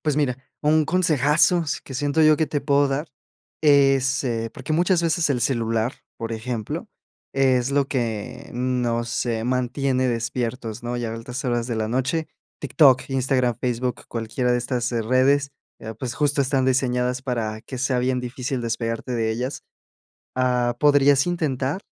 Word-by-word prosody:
Pues, 150 -2 0
mira, 135 -4 0 0.2
un 155 0 +3
consejazo 165 0 +3
s 145 - -3
que 135 - -9
siento 145 +4 +1
yo 155 -1 +6
que 160 - +2
te 145 0 -2
puedo 140 0 +3
dar 140 +4 -2 0.5
es 135 -2 +4
eh, 115 -2 -2
porque 135 +4 -5
muchas 175 +2 +2
veces 165 0 +1
el 130 -4 0
celular, 115 -2 0 0.2
por 115 0 -5
ejemplo, 115 -1 -4 0.5
es 130 -1 +2
lo 140 -1 +2
que 120 -1 -3
nos, 120 -1 -1
eh, 115 -2 -1
mantiene 130 +1 0
despiertos, 115 -1 -3
¿no?, 120 +1 -3
y 120 - -3
a 115 - -3
altas 120 +4 -6
horas 120 -2 0
de 120 -2 -3
la 110 0 -1
noche, 130 +7 -1 0.3
TikTok, 135 -2 +4
Instagram, 130 -3 +1
Facebook, 125 0 -2
cualquiera 120 +2 -1
de 120 - +3
estas, 120 0 -2
eh, 115 - 0
redes, 135 +4 +2 0.3
eh, 110 +1 -7
pues, 125 0 -4
justo 145 -1 +1
están 135 -1 +1
diseñadas 125 -1 +1
para 115 -4 -3
que 130 - -8
sea 130 0 0
bien 125 +1 +1
difícil 125 +1 -4
despegarte 115 +1 -3
de 115 -2 0
ellas. 125 +5 -3 0.7
Ah, 125 -1 +1
podrías 145 -1 +5
intentar 155 -1 -1
130 Hz, 165 wpm, -23 LUFS, 120-140 Hz, 0.7 s, yo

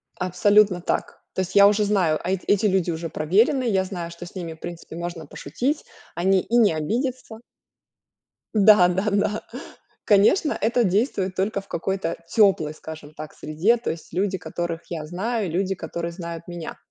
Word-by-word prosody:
Абсолютно 185 +1 +3
так. - - -3
То 190 - -1
есть 190 +1 -5
я 200 0 +9
уже 210 +1 +3
знаю, 180 -7 +2
а, 185 - -1
эт 190 - -1
эти 205 +1 +3
люди 190 -3 +2
уже 165 0 -3
проверены, 210 - +2
я 195 -5 +2
знаю, 180 -3 -5
что 170 +1 -9
с 175 - -12
ними, 170 -3 -5
в 160 - -18
принципе, 170 -2 -8
можно 170 -3 -6
пошутить, 255 - -3 0.3
они 190 +2 +3
и 240 - 0
не 215 -8 +5
обидятся. 230 - -3 1.1
Да-да-да. 205 0 +4 0.6
Конечно, 215 - +4
это 235 +2 +2
действует 190 -1 0
только 200 +2 0
в 195 - -13
какой-то 190 0 -2
тёплой, 190 -8 +3
скажем 155 -1 -10
так, 155 0 -9
среде, 165 +10 +1
то 240 - -3
есть 165 -1 -10
люди, 190 +1 0
которых 170 -2 -4
я 160 -3 -4
знаю, 195 +3 -2
люди, 190 +3 0
которые 170 0 -5
знают 170 -1 -7
меня. 175 -2 -7
185 Hz, 165 wpm, -23 LUFS, 170-210 Hz, 1.1 s, я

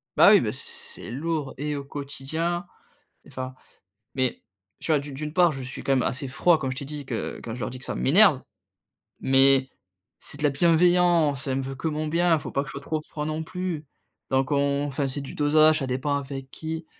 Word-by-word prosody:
bah, - - +8
oui, - - +7
bah, - - -1
c - - -7
c'est - - -11
lourd 150 +2 -3
et 150 +2 -2
au 140 - -4
quotidien 145 +5 -4 0.6
enfin, 130 0 -6 0.6
mais, 130 -2 -1 0.4
tu - - -5
vois, 150 - +4
d'u 145 0 -8
d'une 150 +3 -6
part, 175 -3 +5
je 135 - -7
suis 130 +1 -7
quand 135 - 0
même 130 -2 +3
assez 135 +1 -2
froid, 165 +6 +3
comme 135 -3 -3
je 130 - -5
t'ai 140 - -5
dit 150 -1 -6
que 120 -4 -4
quand 110 - -5
je 125 - -8
leur 105 - -2
dis 130 - -8
que 130 - -9
ça - - -3
m'énerve, 60 +1 +5 0.8
mais 135 0 +4 0.5
c'est - - -7
de - - -7
la 145 - +4
bienveillance. 170 -2 +3
Elle 135 -1 0
me 135 - -2
veut 135 +1 -5
que 160 - -2
mon 155 0 -2
bien, 170 +1 +3
faut - - -7
pas 140 - 0
que - - -9
je - - -7
sois 140 - -6
trop 155 +2 -2
froid, 150 -1 -6
non 155 +1 -3
plus. 170 -3 -4 0.4
Donc 135 0 +1
on 140 0 +1
enfin, 140 0 -2
c'est 135 +2 -2
du 135 - -8
dosage, 155 +1 +4
ça 135 - -3
dépend 130 +3 -1
avec 135 -1 -6
qui, 160 +2 -6
145 Hz, 225 wpm, -25 LUFS, 135-155 Hz, 0.8 s, bah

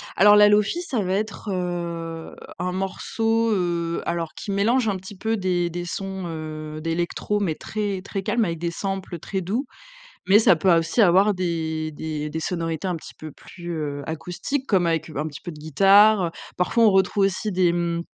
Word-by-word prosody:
alors 205 +1 +7
la 210 0 +7
Lo-fi 210 - +2
ça 270 -11 -2
va 185 0 -1
être, 210 +1 -3
heu, 170 -2 -4 0.2
un 180 0 -1
morceau, 225 +4 0
heu, 170 -3 -1
alors 170 -2 -2
qui 200 - -6
mélange 225 +4 +2
un 200 - 0
petit 190 +2 -10
peu 225 +3 -1
des 180 -2 0
des 175 +1 -5
sons, 190 +1 -5
heu, 155 -1 -6
d'électro 170 +5 -1
mais 180 -6 -1
très 205 -1 -3
très 195 0 -5
calmes 230 +1 +1
avec 165 -1 -3
des 170 0 -2
samples 190 -1 -4
très 190 +4 -3
doux, 220 +10 -2 0.6
mais 200 +3 +7
ça 215 - +5
peut 175 +2 +3
aussi 165 +7 +2
avoir 195 +2 +5
des 160 -3 -2
des 150 0 -4
des 160 - -4
sonorités 165 +1 -3
un 180 - -1
petit 160 - -10
peu 155 -1 -9
plus, 175 +3 -10
heu, 145 -2 -4
acoustiques, 180 - -4
comme 185 -4 +3
avec, 165 -1 0
un 150 0 -3
petit 145 - -9
peu 175 - -6
de 150 - -11
guitare, 195 +6 +5
heu. 165 - -3 0.2
Parfois, 225 +6 +2
on 215 - +6
retrouve 195 +1 +2
aussi 195 +2 -1
des 180 -2 +2
mmh, 170 -1 -1
180 Hz, 195 wpm, -23 LUFS, 165-200 Hz, 0.6 s, alors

